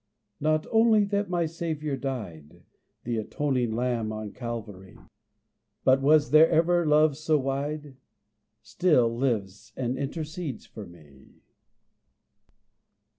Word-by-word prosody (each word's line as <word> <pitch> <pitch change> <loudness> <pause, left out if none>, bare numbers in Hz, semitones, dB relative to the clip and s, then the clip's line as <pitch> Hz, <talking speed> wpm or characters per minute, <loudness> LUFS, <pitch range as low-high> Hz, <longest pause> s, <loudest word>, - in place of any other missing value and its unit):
Not 155 +1 +1
only 225 -1 +4
that 200 -1 -1
my 175 -2 0
Savior 155 -3 -3
died, 105 - -7 0.4
The 120 -1 -2
atoning 125 +1 -1
lamb 120 -2 -1
on 110 -1 -6
Calvary, 105 -6 -7 0.9
But 130 +1 +4
was 150 +1 +4
there 155 +2 +7
ever 170 +1 +2
love 150 -1 +4
so 155 +1 +1
wide? 140 +1 -4 0.7
Still 120 - +2
lives 105 -4 -2
and 125 0 -2
intercedes 155 -1 -5
for 105 -3 -10
me. 75 -6 -18
135 Hz, 110 wpm, -26 LUFS, 115-155 Hz, 0.9 s, there